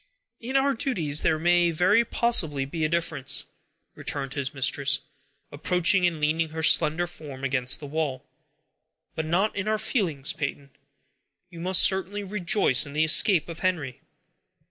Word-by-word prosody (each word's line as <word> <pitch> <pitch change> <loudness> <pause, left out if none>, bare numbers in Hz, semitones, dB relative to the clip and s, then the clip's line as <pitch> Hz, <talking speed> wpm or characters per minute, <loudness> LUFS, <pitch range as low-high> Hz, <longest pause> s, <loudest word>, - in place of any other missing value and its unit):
"In 250 +3 -6
our 275 +1 +2
duties 170 - -2
there 160 - +1
may 175 +1 +2
very 185 +8 +2
possibly 170 - +1
be 160 +4 -5
a 155 - +1
difference," 165 -5 0 0.5
returned 135 -1 -4
his 140 -2 -3
mistress, 135 0 +1 0.5
approaching, 180 +1 +2
and 165 -3 -4
leaning 155 +2 0
her 160 +1 -6
slender 160 +2 +3
form 150 -6 -11
against 130 -2 0
the 150 - -9
wall; 145 -3 -4 0.9
"but 160 -1 -4
not 190 +6 0
in 200 +1 -4
our 215 0 +1
feelings, 165 - -2
Peyton. 140 -1 -6 0.8
You 170 - -11
must 185 +2 +4
certainly 195 +2 +1
rejoice 190 - +1
in 140 - -10
the 155 +1 +1
escape 160 +2 +4
of 170 -1 -9
Henry!" 160 -9 -3
165 Hz, 150 wpm, -25 LUFS, 145-185 Hz, 0.9 s, must